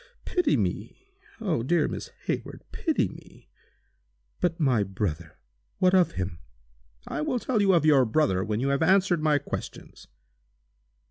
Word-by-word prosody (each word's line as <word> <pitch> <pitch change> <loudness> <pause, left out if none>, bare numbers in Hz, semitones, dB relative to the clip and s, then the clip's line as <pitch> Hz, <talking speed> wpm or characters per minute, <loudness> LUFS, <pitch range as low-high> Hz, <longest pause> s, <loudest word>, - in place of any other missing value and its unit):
Pity 355 -5 +1
me! 385 +1 -4 0.3
Oh! 185 - -1
dear 155 +5 +2
Miss - - -6
Hayward, - - -4
pity - - 0
me!" - - -15 0.9
"But 175 -1 0
my 130 -8 +2
brother—what 80 - -3
of 185 -2 +4
him?" 90 -2 -4 0.7
"I - - -3
will 300 -4 0
tell 235 -1 0
you 195 -1 +4
of 165 -3 +3
your 145 -4 +6
brother 110 -7 +1
when 105 +1 -2
you 135 +3 0
have 140 +2 0
answered 185 0 +3
my 155 -1 +3
questions." - - -7
150 Hz, 140 wpm, -26 LUFS, -, 0.9 s, your